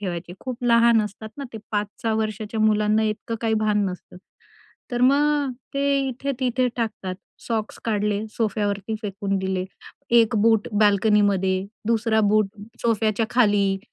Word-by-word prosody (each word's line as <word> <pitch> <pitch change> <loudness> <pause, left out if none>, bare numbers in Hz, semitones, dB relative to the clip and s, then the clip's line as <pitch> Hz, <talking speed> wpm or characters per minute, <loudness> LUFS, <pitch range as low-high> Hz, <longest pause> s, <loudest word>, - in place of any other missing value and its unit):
ठेवायचे. 175 -3 -5
खूप 250 -2 -6
लहान 235 -1 +5
असतात 210 +1 -7
ना 280 - -4
ते 220 - -6
5-6 210 +2 -2
वर्षाच्या 215 0 -2
मुलांना 215 0 +3
इतकं 215 +1 -2
काही 225 -1 +1
भान 210 -1 +2
नसतं. 180 0 -9 0.7
तर 245 - -2
मग 285 +1 +3 0.2
ते 280 0 +2
इथे-तिथे 255 -1 -1
टाकतात. 215 -5 -3 0.3
सॉक्स 220 -2 -3
काढले 210 -1 0
सोफ्यावरती 205 -1 -1
फेकून 200 -1 -2
दिले. 190 -1 -2 0.5
एक 230 0 +4
बूट 225 -2 +3
बाल्कनीमध्ये, 200 -2 +3 0.2
दुसरा 225 -1 +2
बूट 215 0 +3 0.4
सोफ्याच्या 220 -1 +1
खाली. 205 -5 +3
215 Hz, 130 wpm, -23 LUFS, 205-235 Hz, 0.7 s, लहान